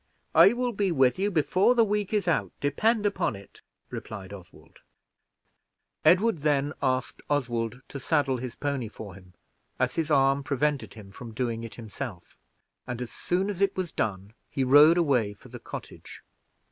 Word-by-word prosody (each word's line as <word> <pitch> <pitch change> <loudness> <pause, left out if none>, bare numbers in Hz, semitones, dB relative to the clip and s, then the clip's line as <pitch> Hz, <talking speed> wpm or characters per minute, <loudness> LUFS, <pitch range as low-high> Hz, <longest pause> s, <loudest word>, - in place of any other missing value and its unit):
"I 170 +7 +7
will 245 0 -1
be 200 -2 0
with 135 0 +3
you 200 +2 +1
before 185 +6 +2
the 235 - +5
week 210 -2 -1
is 205 -4 0
out, 165 - 0
depend 210 - +1
upon 205 - 0
it," 100 0 -14 0.3
replied 100 -3 -7
Oswald. 85 -6 -14 1.2
Edward 180 +4 +4
then 145 0 +1
asked 130 0 -1
Oswald 120 -3 -1
to 140 - -6
saddle 140 -1 +1
his 125 -1 -6
pony 140 -5 -2
for 105 -2 -9
him, 90 -1 -16 0.4
as 130 0 0
his 160 -2 -2
arm 135 -1 +3
prevented 140 0 -1
him 100 -3 -12
from 115 +1 -10
doing 115 -2 -2
it 115 - -8
himself, 110 -4 -8 0.5
and, 125 -2 -4
as 125 -2 -5
soon 185 +2 -1
as 200 -2 -4
it 195 -1 +2
was 180 -4 -2
done, 100 -1 -3 0.2
he 135 - -1
rode 145 +6 +7
away 125 -11 +1
from - - -17
the - - -8
cottage. - - -10
140 Hz, 170 wpm, -27 LUFS, 115-175 Hz, 1.2 s, I